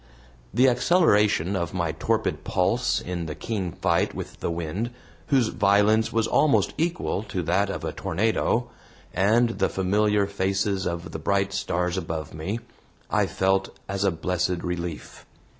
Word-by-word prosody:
The 125 +3 +4
acceleration 120 - +3
of 85 -2 -2
my 85 -3 0
torpid 80 - -1
pulse - - +1
in 85 -2 -4
the 75 - -5
keen 95 +2 -3
fight - - 0
with - - -7
the - - -2
wind, 85 +7 -3 0.4
whose 130 -6 +3
violence 105 +2 +3
was 115 -1 +1
almost 110 -7 +3
equal 170 - -1
to 95 -4 -4
that 95 +5 +1
of - - -4
a - - -2
tornado, 115 +3 0 0.5
and 110 +4 +2
the 95 - +2
familiar 105 +2 +2
faces 95 0 -1
of 85 0 -4
the - - -5
bright 100 +3 0
stars 90 -2 -1
above 80 -3 -4
me, 95 +9 -4 0.5
I - - +2
felt 95 0 0
as 100 0 -2
a 100 - +4
blessed 90 +1 -1
relief. 90 -3 -5
95 Hz, 150 wpm, -25 LUFS, 90-105 Hz, 0.5 s, The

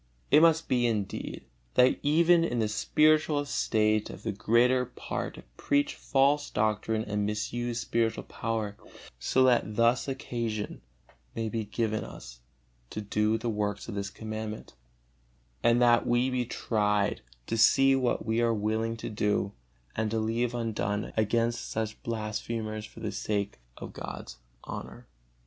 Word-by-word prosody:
It 150 - +7
must 165 0 +4
be, 120 -1 +2
indeed, 105 -4 -3 0.3
that 125 +1 +5
even 165 +3 +4
in 125 -7 -1
the 110 -2 +2
spiritual 155 +7 +3
estate 110 -6 +1
the 110 - -4
greater 120 +5 +3
part - - -5
preach 145 0 +1
false 140 +2 +2
doctrine 110 +1 0
and 105 0 -1
misuse 120 +3 -2
spiritual 115 -1 0
power, 110 -3 -3 0.4
so 130 - +2
that 120 -5 +3
thus 120 +4 +3
occasion 115 -5 -3 0.5
may 115 -1 -2
be 110 -1 -2
given 110 0 -1
us - - -10 0.5
to - - -5
do 105 +2 +1
the 115 +2 -4
works 105 -1 -2
of 115 - -5
this 100 -1 -3
Commandment, 110 +1 -6 0.9
and 120 0 +4
that 120 -1 +4
we 120 +2 +2
be 125 -1 0
tried, 105 -3 0 0.2
to - - -2
see 135 +4 +5
what 130 -4 0
we 110 +1 +1
are 115 -1 +2
willing 110 +2 -1
to - - -6
do 105 -1 0 0.4
and 110 -1 0
to 110 - -1
leave 115 +2 0
undone 105 -3 -2
against 115 +2 0
such 110 0 -3
blasphemers 110 -1 -3
for - - -14
the - - -2
sake 100 - -2 0.2
of - - -8
God's - - -8 0.2
honor. - - -8
115 Hz, 145 wpm, -29 LUFS, 105-120 Hz, 0.9 s, It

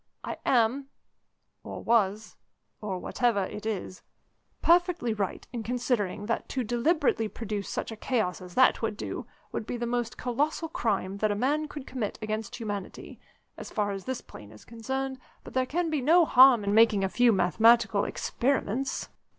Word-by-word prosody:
I - - -5
am, 255 +3 +2 0.8
or - - -7
was 215 -2 +1 0.5
or 200 -3 -3
whatever 225 +2 0
it 210 +3 -7
is 190 -3 -4 0.6
perfectly 345 -8 +3
right 200 -3 -3
in 235 - -3
considering 225 -4 -1
that 230 +1 -2
to 260 - -2
deliberately 240 0 +1
produce 210 -2 -5
such - - -3
a - - -6
chaos 215 -6 -1
as 180 -1 -11
that 260 - +4
would 220 -2 -2
do - - -5 0.2
would 215 - -4
be 245 - -3
the 240 - -2
most 240 -1 -2
colossal 295 +6 -1
crime 200 -8 -1
that 215 +1 +1
a 205 - 0
man 290 +8 0
could 290 -2 -8
commit 250 -7 -4
against 215 -1 -4
humanity, 205 -5 -6 0.4
as - - -8
far 205 -2 -1
as 195 -1 -6
this 260 -1 -3
plane 105 -1 -13
is 105 - -15
concerned, 265 +3 -4 0.2
but - - -11
there 255 0 +1
can 330 +2 -1
be 300 -3 0
no 330 +6 +5
harm 255 -5 +7
in 200 0 0
making 220 -2 +5
a - - +2
few 245 +4 +4
mathematical 220 +3 +4
experiments." 265 0 -1
230 Hz, 170 wpm, -28 LUFS, 205-260 Hz, 0.8 s, harm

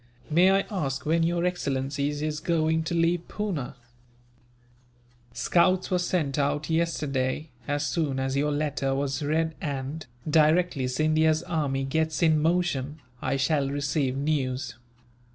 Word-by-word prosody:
"May 175 +4 +5
I 195 0 +4
ask 140 -8 -2
when 165 +2 +2
your 170 +1 +1
excellency 140 -5 -1
is 150 +1 -3
going 160 0 +1
to 170 - -2
leave 170 +1 +1
Poona?" 180 -14 -3 1.6
"Scouts 185 +8 +2
were 180 - +2
sent 155 -6 0
out 145 +2 0
yesterday, 150 -3 -1 0.2
as 145 0 0
soon 145 -6 -1
as 135 0 -1
your 145 +2 +1
letter 145 -2 -1
was 135 0 -1
read 160 +2 0
and, 140 +1 -4 0.2
directly 155 -2 +3
Scindia's 155 +3 +2
army 145 -6 -1
gets 160 +4 0
in 155 -2 +4
motion, 160 -4 0 0.2
I 140 - 0
shall 140 +1 +1
receive 140 -1 -1
news. 140 -3 -1
150 Hz, 135 wpm, -27 LUFS, 140-165 Hz, 1.6 s, May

